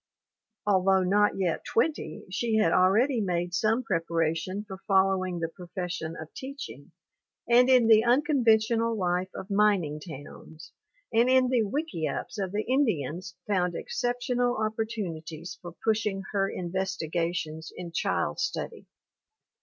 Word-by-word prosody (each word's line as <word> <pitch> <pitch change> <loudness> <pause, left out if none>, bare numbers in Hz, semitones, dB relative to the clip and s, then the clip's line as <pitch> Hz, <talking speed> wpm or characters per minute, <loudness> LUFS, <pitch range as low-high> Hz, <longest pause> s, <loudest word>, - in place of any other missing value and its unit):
Although 190 -1 +3
not 205 +3 +3
yet 180 -4 -1
twenty, 300 +7 -1
she 225 +3 0
had 220 0 +3
already 220 +7 +3
made 175 -2 -1
some 225 +6 +1
preparation 165 +2 -1
for 190 -2 -8
following 190 -2 +2
the 165 -1 -1
profession 175 -1 -5
of 160 0 -9
teaching, 275 +2 -8 0.6
and 245 +2 +5
in 250 -3 +6
the 220 -1 +6
unconventional 230 -4 +3
life 180 -1 0
of 190 - -7
mining 195 -7 +2
towns, 155 0 -11 0.4
and 235 +3 +4
in 260 -1 +4
the 250 -2 +3
wick 290 +10 -2
iups 160 +6 -3
of 185 - -4
the 210 +2 -1
Indians 180 - 0
found 180 -4 0
exceptional 245 +1 -1
opportunities 205 -7 -4
for 175 -1 -9
pushing 210 -3 0
her 195 -1 +1
investigations 170 -3 -3
in 175 -2 -6
child 195 +8 -1
study. 265 0 -3
195 Hz, 130 wpm, -28 LUFS, 175-230 Hz, 0.6 s, in